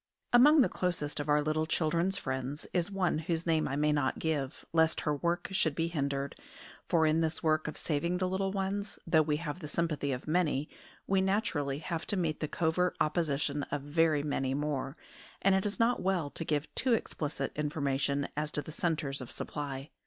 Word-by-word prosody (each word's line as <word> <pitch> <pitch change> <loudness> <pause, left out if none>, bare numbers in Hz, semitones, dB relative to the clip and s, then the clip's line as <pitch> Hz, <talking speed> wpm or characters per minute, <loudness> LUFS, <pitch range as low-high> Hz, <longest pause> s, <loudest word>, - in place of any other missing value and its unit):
AMONG 290 +5 +8
the - - +5
closest 165 -5 -1
of 145 0 -3
our 150 0 +4
little 155 +1 0
children's 170 +4 +1
friends 130 -1 -3
is 175 0 +1
one 185 -5 0
whose 165 +1 -2
name 160 -2 +2
I 140 - -2
may 150 +1 +2
not 145 -3 +1
give, 150 -3 -2
lest 160 -1 +3
her 150 -1 0
work 170 +4 -1
should 160 -6 +1
be 165 0 0
hindered; 140 -3 -2 0.5
for 160 -2 +4
in 155 +1 +3
this 160 +1 -1
work 155 -1 +2
of 155 - -5
saving 170 +3 0
the 185 0 0
little 190 +1 -1
ones, 195 +1 -2
though 160 -1 +4
we 150 -1 +1
have 155 +1 -5
the 155 - -6
sympathy 150 -3 -1
of 125 +2 -4
many, 155 -3 +1 0.4
we 195 -1 +2
naturally 190 -9 0
have 165 +2 -4
to 205 - 0
meet 160 -4 0
the 155 - -1
covert 175 +4 0
opposition 150 -2 0
of 140 -1 -3
very 155 0 +2
many 135 -2 -1
more, 145 -1 -2 0.4
and 195 - +4
it 190 +2 +2
is 205 - -4
not 235 +2 +3
well 180 -6 0
to - - -3
give 150 -1 -1
too 250 -3 +2
explicit 150 -9 -3
information 140 -2 0
as 150 +1 -1
to 150 - -3
the - - -8
centres 150 -5 -1
of 125 - -7
supply. 140 -1 -5
155 Hz, 195 wpm, -31 LUFS, 145-175 Hz, 0.5 s, AMONG